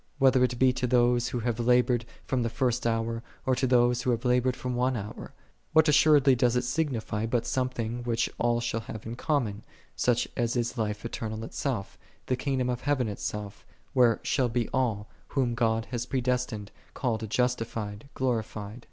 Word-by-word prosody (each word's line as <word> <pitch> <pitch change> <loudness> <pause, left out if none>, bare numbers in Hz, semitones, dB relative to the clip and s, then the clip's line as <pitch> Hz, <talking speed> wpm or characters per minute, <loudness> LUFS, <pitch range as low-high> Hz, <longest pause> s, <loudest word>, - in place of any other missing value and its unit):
whether 130 -2 +5
it 125 -1 +1
be 130 +1 +4
to 125 0 -1
those 120 0 +3
who 120 - -3
have 120 0 -1
labored 125 0 +3 0.2
from 130 -2 0
the 115 - 0
first 125 -1 0
hour, 115 0 -1 0.2
or 130 - +3
to 130 +1 +1
those 120 -1 +3
who 125 - -1
have 120 0 0
labored 125 0 +2
one 125 0 -1
hour? 105 +1 -7 0.2
' - - -41
What 160 0 +6
assuredly 150 -2 +6
doth 125 -1 +2
it 125 - +2
signify, 125 -6 -1
but 115 0 0
something, 120 -2 -2
which 120 -1 0
all 120 0 +2
shall 115 -1 -1
have 110 -1 -8
in 115 - -4
common, 120 -6 -1 0.3
such 120 -1 +1
as 120 -1 0
is 120 0 -1
life 105 -2 -2
eternal 110 -1 -4
itself, 115 -3 -4 0.3
the 130 - +1
kingdom 130 -1 -1
of 125 -1 -2
heaven 140 -4 +1
itself, 105 0 -5 0.3
where 120 -3 +4
shall 130 -3 +1
be 120 -1 0
all, 110 -5 0 0.2
whom 130 -4 0
God 115 -1 +1
hath 120 0 -3
predestinated, 125 -5 -1 0.2
called, 115 -4 -2
justi 125 +1 +1
fied, 110 +2 -6
glorified? 110 -3 -2
120 Hz, 180 wpm, -28 LUFS, 115-125 Hz, 0.3 s, What